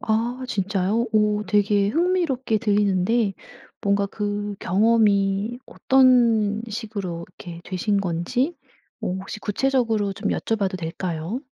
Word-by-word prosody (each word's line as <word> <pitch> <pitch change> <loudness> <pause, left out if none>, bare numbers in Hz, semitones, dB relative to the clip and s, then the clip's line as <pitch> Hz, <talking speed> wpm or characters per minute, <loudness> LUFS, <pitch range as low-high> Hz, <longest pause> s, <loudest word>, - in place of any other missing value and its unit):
아 235 +4 -1
진짜요? 200 +2 0
오 210 -1 +2
되게 205 -1 +2
흥미롭게 300 - +1
들리는데 205 +1 +1 0.5
뭔가 200 -1 +1
그 205 0 -3
경험이 205 +2 +2
어떤 235 -5 +3
식으로 200 -6 -5
이렇게 175 -2 -10
되신 200 +2 0
건지 195 - -1 0.4
뭐 180 - -3
혹시 190 +2 -7
구체적으로 225 -3 0
좀 - - -3
여쭤봐도 200 -4 -1
될까요? 170 +5 -4
210 Hz, 255 characters per minute, -23 LUFS, 195-230 Hz, 0.5 s, 어떤